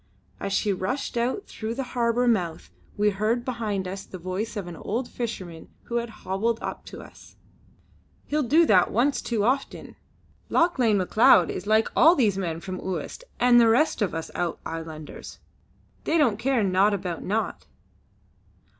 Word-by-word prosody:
As 200 - -4
she 200 +1 +1
rushed 195 +11 -3
out 245 - -1
through 220 +1 -5
the 270 - -2
harbour 240 0 +1
mouth 180 -8 -1 0.3
we 210 0 +3
heard 220 +5 -1
behind 215 -6 -2
us 195 +1 -6
the 185 - -9
voice 185 +6 -4
of 200 - -3
an 175 -1 -8
old 235 +9 -3
fisherman 185 -9 -6
who 235 - -3
had 235 0 -2
hobbled 215 +2 -2
up - - -6
to - - -9
us: - - -16 0.9
"He'll 300 +1 0
do 305 +6 +4
that 185 - +4
once 265 +6 +1
too 225 -4 -1
often! 260 +5 -2 0.5
Lauchlane 260 - +3
Macleod 185 -2 +5
is 185 - -6
like 220 +1 +3
all 330 +3 +7
these 220 - +2
men 170 -4 -3
from 185 0 -6
Uist 190 - -5 0.2
and 240 -1 +6
the 230 - +5
rest 250 +2 +2
of 205 - +2
the 165 0 -5
Out 175 -2 -2
Islanders. 160 -2 -7 0.7
They 325 - +2
don't 240 -9 +2
care 250 -1 +1
'naught 195 +2 +3
about 180 -3 -4
naught.'" 220 +3 -2
215 Hz, 165 wpm, -25 LUFS, 185-240 Hz, 0.9 s, all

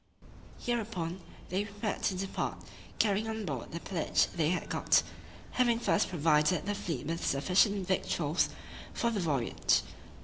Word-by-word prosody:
Hereupon, 200 -7 -2 0.3
they 190 +3 0
prepared 205 +1 -4
to 190 - +1
depart, 195 +1 -3 0.3
carrying 210 0 +2
on 220 -1 -3
board 135 -8 -2
all - - -10
the 170 - -4
pillage 170 -2 +1
they 160 -3 +2
had 180 - -1
got, - - +3 0.5
having 240 -2 +3
first 215 - +2
provided 160 +1 +3
the 205 - 0
fleet 175 -10 -4
with 165 +2 -3
sufficient 190 +7 +3
victuals 170 -4 +1 0.5
for 235 - +1
the 215 - -1
voyage. 140 -9 +1
185 Hz, 145 wpm, -31 LUFS, 165-205 Hz, 0.5 s, got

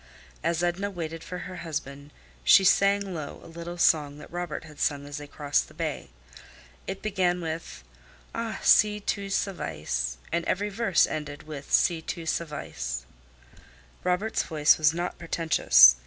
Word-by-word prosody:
As 170 +1 0
Edna 175 +3 0
waited 165 -3 -5
for 180 - -6
her 185 0 -7
husband 145 -4 -5 0.3
she 125 - +7
sang 200 0 +3
low 155 -4 -6
a - - -12
little 170 +1 -7
song 150 -4 +3
that - - -12
Robert 175 -3 -4
had 155 -2 -13
sung 140 -1 0
as 145 0 -6
they 145 0 -8
crossed 145 -1 0
the - - -17
bay. - - -3 0.8
It 190 - -5
began 185 -4 +1
with 160 - -5 0.5
"Ah! 230 -1 -3
si 210 0 +5
tu 200 -1 -2
savais," 75 - -2
and 170 0 0
every 205 +3 0
verse 200 -3 +3
ended 145 -2 -5
with 150 -2 -8
"si 165 -2 +3
tu 165 +1 -5
savais." 150 - -3 1.0
Robert's 180 +5 +1
voice 150 -2 +3
was 155 -1 +5
not 175 +2 -4
pretentious. 65 - +6
165 Hz, 155 wpm, -27 LUFS, 145-180 Hz, 1.0 s, she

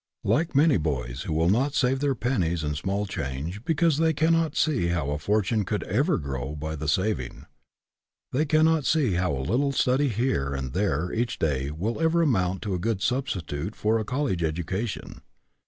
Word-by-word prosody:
Like 160 -1 +1
many 145 -1 +5
boys 65 -5 -3
who 80 - -1
will 80 +3 +3
not 135 +7 +1
save 130 0 +2
their 140 -1 +1
pennies 95 -9 0
and 75 0 -2
small 100 +7 -1
change 80 - -4
because 165 -1 +2
they 160 0 +3
cannot 160 +1 +2
see 145 - +1
how 85 -5 -1
a 75 - -2
fortune 105 +5 +1
could 105 +2 -2
ever 140 - +1
grow 70 -1 -4
by 80 +1 -4
the 80 0 -5
saving, 75 - -1 0.9
they 145 +5 +1
cannot 155 +1 +3
see 140 - +2
how 90 0 +1
a 70 - -1
little 135 - +1
studying 135 +1 +2
here 105 - 0
and 65 -1 -4
there 90 -4 0
each 120 +1 -1
day 70 -4 0
will 100 - -3
ever 165 +1 +3
amount 95 - +1
to 100 - -2
a 90 - -1
good 105 0 -1
substitute 95 - -2
for 110 +1 +1
i - - -1
a - - -2
college 125 -6 -1
education. 90 +7 -3
100 Hz, 190 wpm, -26 LUFS, -, 0.9 s, many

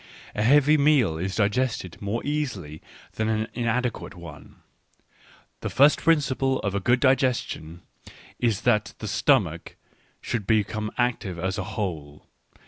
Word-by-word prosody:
A 105 - -2
heavy 145 +6 +5
meal 135 - +3
is 95 +2 -3
digested 110 -3 -1
more 105 +3 -3
easily 125 - -3 0.4
than 110 0 0
an 110 0 0
inadequate 120 -3 -2
one. 80 -4 -12 1.0
The - - -4
first 145 +2 +5
principle 135 -4 +2
of 100 - -2
a 100 - 0
good 120 +5 +2
digestion 125 - 0 0.6
is 115 -5 0
that 105 -4 +1
the - - -6
stomach - - +1 0.4
should 110 -5 -4
become 110 0 0
active 115 -7 -1
as 95 +3 -2
a - - -2
whole. 75 -8 -5
110 Hz, 135 wpm, -25 LUFS, 95-130 Hz, 1.0 s, heavy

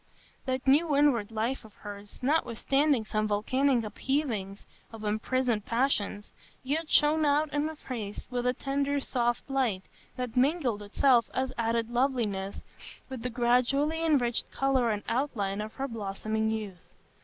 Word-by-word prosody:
That 260 0 -1
new 290 +3 +4
inward 275 -8 +3
life 225 +4 -2
of 215 -2 -15
hers, 205 +2 -10
notwithstanding 275 -2 +2
some 215 0 0
volcanic 245 +5 +2
upheavings 215 -3 -2 0.3
of 225 -1 -9
imprisoned 220 +1 0
passions, 230 -4 0 0.3
yet 305 +4 -2
shone 305 +1 +4
out 295 0 +2
in 295 +1 +1
her 315 - -6
face 225 -8 -6
with 245 0 -1
a 250 - +3
tender 280 +2 -1
soft 240 -3 -1
light 255 -9 0 0.3
that 250 -2 -4
mingled 255 -5 +2
itself 235 +3 +3
as 260 0 -1
added 230 0 0
loveliness 235 -7 -1 0.5
with 260 -3 -6
the 250 - -2
gradually 255 +6 +2
enriched 255 -7 +2
colour 265 -3 +1
and 210 -1 -1
outline 210 -6 -1
of 215 +1 -6
her 275 - -2
blossoming 220 -1 -2
youth. 210 -5 -4
245 Hz, 145 wpm, -29 LUFS, 215-275 Hz, 0.5 s, new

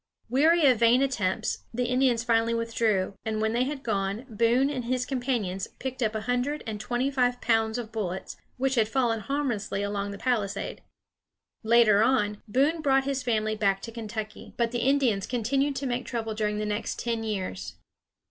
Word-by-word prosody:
Weary 315 +5 +4
of 255 -5 +5
vain 235 +3 +5
attempts, 220 -6 -1
the 245 +2 -1
Indians 250 -1 +2
finally 230 -1 +2
withdrew; 225 -4 0
and 220 -1 -2
when 220 0 0
they 245 +2 +2
had 280 0 -4
gone, 200 +2 -1
Boone 235 +3 +2
and 255 -4 -3
his 250 +1 0
companions 240 -9 -2
picked 260 0 -5
up 220 -2 0
a 215 - -1
hundred 250 +6 -1
and 215 -3 -4
twenty 245 +5 -1
five 245 -2 +1
pounds 225 0 +1
of 230 -2 -5
bullets, 190 -4 -4 0.2
which 265 +1 +1
had 225 -4 +3
fallen 230 -1 +1
harmlessly 220 -5 -2
along 205 0 -2
the 200 - -6
palisade. 215 -6 -2 0.8
Later 220 -2 +5
on, 210 -4 +2
Boone 285 +9 +2
brought 270 -2 +3
his 275 -1 -1
family 215 -3 0
back 200 -2 +1
to 230 - -6
Kentucky; 220 -2 -7
but 235 -1 +1
the 240 - -1
Indians 250 -6 +2
continued 270 +4 0
to 275 - -3
make 250 -1 -2
trouble 225 -2 -3
during 210 -1 -1
the 210 - -2
next 210 +1 -2
ten 230 -1 -2
years. 140 - -4
230 Hz, 180 wpm, -27 LUFS, 215-255 Hz, 0.8 s, of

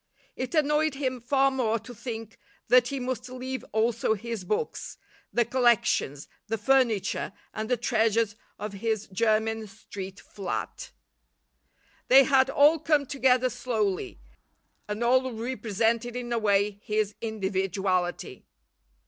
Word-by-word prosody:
It 255 +5 -4
annoyed 300 0 +2
him 260 -3 -2
far 270 +2 +3
more 235 -4 +1
to 230 +3 -10
think 225 -1 -7 0.3
that 250 -1 +6
he 275 +2 -3
must 250 0 -4
leave 255 +1 -5
also 220 0 +1
his 225 -1 -5
books, 210 - -3 0.3
the 240 - +2
collections, 235 - +2 0.2
the 225 +1 -1
furniture 225 -4 +1 0.2
and 220 0 -4
the 250 - +2
treasures 225 -2 +1 0.2
of 210 -1 -5
his 215 +1 -2
Jermyn 220 +2 +1
Street 195 -1 -9
flat. 200 - -5 1.2
They 270 +2 +8
had 265 -1 +4
all 295 +4 +5
come 295 -1 +2
together 255 -2 +2
slowly, 210 - -2 0.7
and 210 +3 -3
all 255 +2 +3
represented 230 0 -1
in 240 -1 -3
a 235 - +1
way 205 -1 +1
his 210 -1 0
individuality. 190 -4 -2
230 Hz, 125 wpm, -27 LUFS, 210-255 Hz, 1.2 s, They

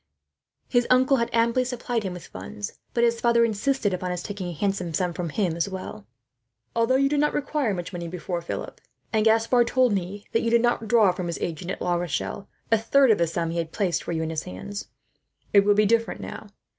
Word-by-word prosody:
His 245 -1 +2
uncle 260 +2 +4
had 235 -1 0
amply 235 +2 +2
supplied 245 -1 -2
him 190 -3 -4
with 180 - -9
funds, 100 +2 -7 0.2
but 235 - +3
his 235 -1 +2
father 235 -1 +4
insisted 225 -1 0
upon 180 0 -2
his 180 0 -3
taking 205 -3 -5
a - - -3
handsome 180 -1 -2
sum 180 0 0
from 170 -1 -3
him. 175 0 0 1.2
"Although 230 +2 +3
you 275 +1 +4
did 290 +1 +1
not 295 +1 +2
require 285 -4 0
much 175 +1 -6
money 170 -1 -4
before, 175 0 -4
Philip 170 - -6 0.3
and 215 -1 +3
Gaspard 230 +2 +4
told 255 -3 +3
me 195 +2 -3
that 225 - +2
you 230 - 0
did 235 0 +4
not 240 -2 +1
draw, 215 -4 +5
from 180 -1 -4
his 170 - -3
agent 170 +1 -4
at 195 - -4
La 175 - +1
Rochelle, 175 +3 -3 0.2
a 225 - +5
third 260 +3 +4
of 210 - +3
the 170 - +3
sum 165 0 -2
he 170 - -2
had 165 -1 -3
placed 180 -5 0
for - - -5
you 160 -1 -1
in 160 - -3
his 155 -1 -2
hands 200 - -7 0.7
it 200 -1 +7
will 205 0 +4
be 210 +1 +4
different 230 +2 +1
now. 210 - -8
205 Hz, 220 wpm, -25 LUFS, 175-235 Hz, 1.2 s, it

